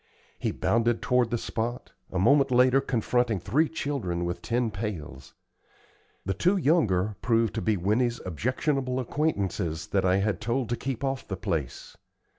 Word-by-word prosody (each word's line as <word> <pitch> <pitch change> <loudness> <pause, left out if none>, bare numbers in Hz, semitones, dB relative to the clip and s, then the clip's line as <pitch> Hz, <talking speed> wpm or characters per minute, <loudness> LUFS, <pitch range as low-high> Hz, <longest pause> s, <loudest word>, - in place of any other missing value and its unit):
He - - 0
bounded 115 0 +1
toward 125 -2 +2
the 120 - 0
spot, 115 +2 -4 0.2
a 95 - -2
moment 135 +8 +4
later 130 +2 +4
confronting 120 -4 0
three 150 - +1
children 120 - -2
with 85 0 -3
tin 120 -1 0
pails. 85 - -6 0.9
The 95 - 0
two 180 - +2
younger 110 - +2
proved 115 -3 +2
to - - -2
be 110 -2 +1
Winnie's 115 +6 +1
objectionable 130 - -1
acquaintances 100 - -1
that 95 +3 +1
I 95 0 +3
had 100 -2 0
told 120 +2 -1
to 120 - 0
keep 130 0 -4
off 135 -1 -2
the 95 - -4
place. 80 -7 -4
115 Hz, 155 wpm, -27 LUFS, 95-130 Hz, 0.9 s, moment